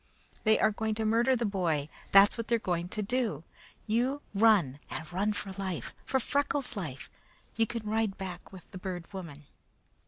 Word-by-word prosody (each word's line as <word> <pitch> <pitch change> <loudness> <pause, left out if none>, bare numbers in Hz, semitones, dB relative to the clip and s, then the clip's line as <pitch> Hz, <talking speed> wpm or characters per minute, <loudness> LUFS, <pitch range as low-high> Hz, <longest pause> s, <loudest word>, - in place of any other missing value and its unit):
They 220 0 +5
are - - +3
going 220 +1 -2
to 220 0 -1
murder 235 +4 +3
the 235 -1 0
boy; 170 -8 0 0.2
that's 195 +1 +8
what 230 -1 -4
they 235 - +3
are - - +3
going 175 -5 -2
to 215 - -2
do. 220 - -1 0.4
You 250 +6 0
run, 195 - +4
and 160 +2 -6
run 200 +4 +1
for 205 -1 -3
life! 190 -3 -3
For 265 - +1
Freckles' 280 0 0
life! 155 -10 -5 0.4
You 225 0 +2
can 230 -2 -5
ride 215 -2 0
back 180 -2 -7
with 185 -3 -13
the 185 - -7
Bird 180 -1 -6
Woman." 155 -6 -8
205 Hz, 185 wpm, -30 LUFS, 180-225 Hz, 0.4 s, that's